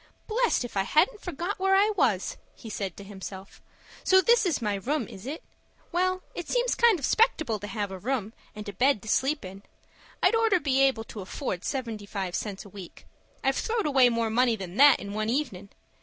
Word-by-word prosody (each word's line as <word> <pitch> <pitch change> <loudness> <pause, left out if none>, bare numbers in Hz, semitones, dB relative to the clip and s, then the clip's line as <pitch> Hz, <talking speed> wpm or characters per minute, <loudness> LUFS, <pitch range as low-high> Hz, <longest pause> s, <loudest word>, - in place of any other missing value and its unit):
"Blest 465 - +1
if 240 - -9
I 195 - +2
hadn't 360 - +2
forgot 360 +3 -4
where 385 0 +3
I 410 +2 +4
was," 230 - 0 0.2
he 225 - -10
said 195 -4 -4
to 200 - -9
himself. 195 -1 -9 0.4
"So 375 0 +6
this 460 +1 +4
is 330 - 0
my 210 -3 -1
room, 240 +5 -2
is 195 +5 -10
it? 300 +4 -5 0.5
Well, 370 +1 0
it 350 - -6
seems - - +1
kind 470 -5 +4
of 280 - -3
'spectable 315 - +2
to 205 - -5
have 205 -1 -3
a 190 - -6
room 225 -1 -2 0.2
and 210 0 -8
a 205 - -5
bed 250 +1 +2
to - - -11
sleep 270 +2 +1
in. 190 +1 -9 0.6
I'd - - +5
orter 450 -5 +3
be 270 -3 +1
able 265 -5 +3
to 215 -2 -9
afford 185 -1 -4
seventy 230 -6 -4
five 190 -3 -4
cents 200 0 -4
a - - -12
week. 190 -3 -11 0.4
I've 270 0 +1
throwed 450 -2 -1
away 265 -4 +5
more 230 -1 0
money 240 0 +3
than 190 -3 -8
that 290 +1 +7
in 200 0 -7
one 215 +1 -1
evenin'. 230 -8 -2
245 Hz, 210 wpm, -27 LUFS, -, 0.6 s, that